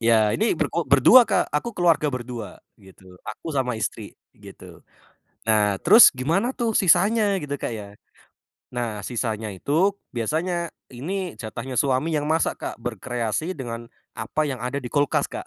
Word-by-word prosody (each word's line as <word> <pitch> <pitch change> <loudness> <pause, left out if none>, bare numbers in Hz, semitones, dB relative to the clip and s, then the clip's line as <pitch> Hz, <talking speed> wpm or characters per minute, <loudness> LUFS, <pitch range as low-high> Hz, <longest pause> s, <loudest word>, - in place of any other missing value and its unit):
Ya 110 -2 +3
ini 220 -5 +1
ber - - -2
kok 170 -5 -2
berdua 180 - +7
Kak, - - 0
aku 205 +10 -2
keluarga 165 -4 +3
berdua 120 -4 -6 0.2
gitu, 95 -2 -17
aku 110 - -9
sama 125 -4 -1
istri 110 - -5 0.2
gitu. - - -14 0.7
Nah 105 -3 +2
terus 215 +7 +9
gimana 165 - 0
tuh 235 -4 -2
sisanya 200 +3 +3
gitu 145 -1 -4
Kak - - -3
ya? 105 -2 -7 0.9
Nah, 115 -4 -3
sisanya 110 -3 -3
itu 165 - +1 0.2
biasanya 170 +9 -1 0.2
ini 180 +9 -5
jatahnya 125 +3 -6
suami 140 +3 +1
yang 150 0 -1
masak 160 +1 0
Kak, - - -5
berkreasi 120 - -3
dengan 120 -3 -6 0.3
apa 115 +7 -2
yang 130 - -4
ada 125 +4 -3
di 120 - -5
kulkas 145 -1 +1
Kak. - - -7
130 Hz, 155 wpm, -23 LUFS, 115-170 Hz, 0.9 s, terus